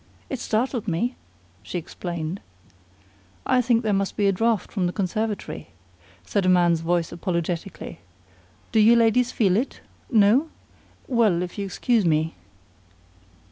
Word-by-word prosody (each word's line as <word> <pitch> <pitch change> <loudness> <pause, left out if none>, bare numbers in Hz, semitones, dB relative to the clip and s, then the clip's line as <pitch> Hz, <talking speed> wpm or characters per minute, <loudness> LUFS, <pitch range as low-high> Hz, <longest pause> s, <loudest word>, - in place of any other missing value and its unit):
"It 265 - -3
startled 230 0 -1
me," 220 +9 -1 0.5
she 140 - -5
explained. 170 +1 -5 1.0
"I 250 - +3
think 235 -1 +2
there 215 -2 +1
must 195 0 -1
be 205 - +3
a - - +5
draft 225 +1 0
from 185 -4 0
the - - -1
conservatory," 200 - -3 0.6
said 200 - 0
a 185 - +2
man's 175 -2 +4
voice 170 0 0
apologetically. 170 - -4 0.7
"Do 225 - +3
you 225 +2 +7
ladies 235 +1 +3
feel 195 -5 +2
it? 245 +7 -2 0.3
No? 230 +7 +4 0.6
Well, 215 -9 +2
if 180 - -7
you'll 200 - -2
excuse 230 +4 +1
me 160 -1 +1
200 Hz, 140 wpm, -24 LUFS, 175-230 Hz, 1.0 s, you